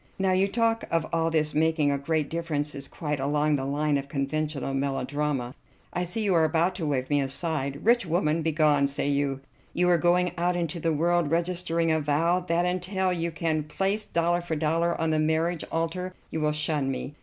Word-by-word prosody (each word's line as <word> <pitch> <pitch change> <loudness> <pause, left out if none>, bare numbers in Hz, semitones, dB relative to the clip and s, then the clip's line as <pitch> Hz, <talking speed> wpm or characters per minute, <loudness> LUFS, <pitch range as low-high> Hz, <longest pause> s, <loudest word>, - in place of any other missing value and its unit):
Now, 190 -1 +1
your 190 +1 +3
talk 225 +1 +1
of 165 -1 +1
all 165 0 +2
this 155 -2 +1
making 155 -1 +2
a 140 - +1
great 155 +1 0
difference 155 -3 -2
is 140 -1 -6
quite 150 -2 -3
along 150 +2 +1
the 135 -1 -2
line 145 0 +1
of 140 - -7
conventional 140 0 -2
melodrama. 135 -1 -1 0.4
I 180 0 -1
see 195 +6 -2
you 200 -3 +2
are 165 -2 +4
about 165 +3 +2
to 165 -5 -2
wave 130 -3 -1
me 145 -1 +3
aside. 140 +1 -2
'Rich 235 -4 +4
woman, 165 -1 +1
begone,' 150 -3 +3
say 140 +1 -2
you. 140 -1 0 0.3
You 180 0 +3
are 175 -1 +4
going 180 +1 +3
out 175 +1 +1
into 170 -1 -2
the 165 0 0
world, 170 +1 +1
registering 170 0 0
a 160 - +2
vow 160 +4 +2
that 175 -1 0
until 185 +1 0
you 170 -1 -1
can 160 -1 -1
place 195 +7 -1
dollar 170 +1 0
for 170 -2 -3
dollar 165 +2 0
on 160 -1 +1
the 155 - +2
marriage 160 +2 +1
altar 180 +3 -2 0.2
you 160 - -2
will 150 0 +2
shun 150 -2 -1
me. 135 +2 -4
160 Hz, 200 wpm, -27 LUFS, 145-175 Hz, 0.4 s, are